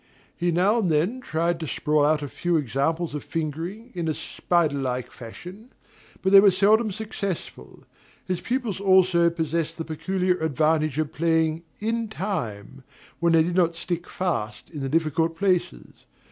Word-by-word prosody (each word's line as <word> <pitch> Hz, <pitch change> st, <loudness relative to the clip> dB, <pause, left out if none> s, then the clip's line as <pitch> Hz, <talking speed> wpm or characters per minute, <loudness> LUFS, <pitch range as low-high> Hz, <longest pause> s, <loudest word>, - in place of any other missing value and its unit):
He 175 Hz, -, 0 dB
now 190 Hz, +7 st, +3 dB
and 185 Hz, -7 st, +1 dB
then 175 Hz, +12 st, +1 dB
tried 170 Hz, -5 st, -1 dB
to 160 Hz, -, -4 dB
sprawl 150 Hz, +1 st, +1 dB
out 150 Hz, 0 st, +2 dB
a -, -, -3 dB
few 175 Hz, +4 st, 0 dB
examples 150 Hz, +5 st, -1 dB
of 150 Hz, -, -4 dB
fingering, 165 Hz, -, -4 dB
in 170 Hz, -3 st, -3 dB
a 155 Hz, -, 0 dB
spider 160 Hz, -5 st, 0 dB
like 125 Hz, -2 st, -3 dB
fashion; 180 Hz, -, -11 dB, 0.5 s
but 190 Hz, -, +2 dB
they 195 Hz, -, +10 dB
were 200 Hz, 0 st, +7 dB
seldom 210 Hz, +4 st, +3 dB
successful. 200 Hz, -3 st, -6 dB, 0.4 s
His 185 Hz, -2 st, -2 dB
pupils 240 Hz, -6 st, -2 dB
also 185 Hz, -3 st, +4 dB
possessed 165 Hz, 0 st, -2 dB
the 165 Hz, -, -4 dB
peculiar 180 Hz, +3 st, -1 dB
advantage 155 Hz, -1 st, +1 dB
of 155 Hz, -2 st, -1 dB
playing 160 Hz, 0 st, +1 dB, 0.2 s
"in 225 Hz, +1 st, -1 dB
time," 135 Hz, -, -5 dB, 0.4 s
when 170 Hz, -1 st, +2 dB
they 160 Hz, -1 st, +6 dB
did 175 Hz, +2 st, -2 dB
not 170 Hz, -2 st, +2 dB
stick 175 Hz, +1 st, -4 dB
fast 165 Hz, -12 st, -3 dB
in 155 Hz, -, -7 dB
the 135 Hz, -1 st, -3 dB
difficult 160 Hz, +1 st, 0 dB
places. 180 Hz, -, -1 dB
170 Hz, 160 wpm, -25 LUFS, 155-190 Hz, 0.5 s, they